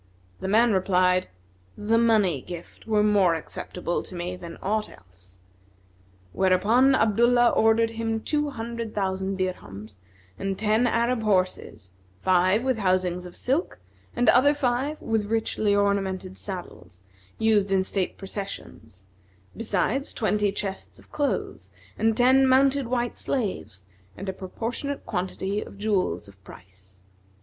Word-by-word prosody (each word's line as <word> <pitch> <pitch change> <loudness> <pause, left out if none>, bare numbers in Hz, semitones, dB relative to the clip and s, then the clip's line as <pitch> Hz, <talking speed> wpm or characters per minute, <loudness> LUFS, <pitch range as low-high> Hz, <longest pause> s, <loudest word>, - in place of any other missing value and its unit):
The - - -4
man 225 +3 +4
replied, 185 -1 +2 0.5
"The 225 +2 +2
money 210 - +3
gift 175 - -10
were 210 -1 +3
more 200 -5 +4
acceptable 175 +2 -4
to 185 - -9
me 175 +1 -4
than 170 -2 -9
aught 215 +2 -1
else," 90 +1 -15 0.9
whereupon 215 +8 +4
Abdullah 240 +2 +4
ordered 225 +1 +3
him 225 0 -2
two 295 +5 -1
hundred 230 -3 -6
thousand 190 -1 -1
dirhams 110 - -5 0.4
and 195 -1 -2
ten 220 +3 +2
Arab 235 +1 +1
horses, 185 - -1 0.3
five 185 +4 +3
with 260 -3 0
housings 185 -2 0
of 175 - -13
silk 280 +8 -1 0.4
and 245 0 +1
other 285 +3 +5
five 270 +2 -1
with 220 -2 -1
richly 215 -2 0
ornamented 195 -2 0
saddles, 95 - -9 0.3
used 210 -3 +2
in 190 -1 +3
state 190 -1 -2
processions; 190 - -8 0.5
besides 230 +5 -1
twenty 210 -3 +1
chests 195 -1 -6
of - - -20
clothes 290 -1 -2 0.2
and 225 0 +1
ten 260 +2 +5
mounted 270 0 +3
white 240 -1 -2
slaves 190 - -3 0.3
and 195 - -7
a 190 - -2
proportionate 235 +9 -5
quantity 190 +3 -3
of - - -10
jewels 195 - -1
of 95 -1 -18
price. 95 0 -16
205 Hz, 130 wpm, -25 LUFS, 185-230 Hz, 0.9 s, other